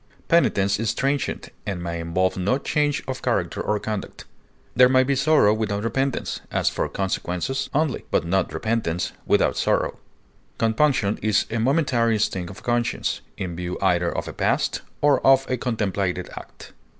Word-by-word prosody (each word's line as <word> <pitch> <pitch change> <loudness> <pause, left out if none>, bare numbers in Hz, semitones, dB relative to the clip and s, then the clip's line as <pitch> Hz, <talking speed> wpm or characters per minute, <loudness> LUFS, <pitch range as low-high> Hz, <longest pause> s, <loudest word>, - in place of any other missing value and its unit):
Penitence 100 -12 +3
is 115 -2 -1
transient, 140 +1 -1
and 90 -4 -4
may 85 -1 -3
involve 85 +3 0
no 100 +8 +1
change 145 +1 0
of 130 -1 -4
character - - -1
or 105 - 0
conduct. 105 -2 -5 0.5
There 125 +1 +7
may 130 0 +5
be 140 +1 +1
sorrow 135 -6 +4
without 105 -2 -2
repentance, 135 +3 -1
as - - +1
for - - -2
consequences 95 +6 -2
only, 150 -2 0
but - - +1
not 95 +2 0
repentance 110 -7 -1
without - - +2
sorrow. - - 0 0.6
Compunction 115 -2 +2
is 110 0 +2
a 115 - -1
momentary 120 -3 +2
sting 90 -4 -1
of 95 - -11
conscience, 120 -1 -1 0.2
in 90 -3 -4
view 90 +1 -4
either 90 -3 +2
of - - -4
a - - -6
past - - 0 0.2
or 145 -2 +4
of 135 0 +5
a - - +3
contemplated 100 -6 -2
act. - - -11
110 Hz, 160 wpm, -23 LUFS, 95-130 Hz, 0.6 s, There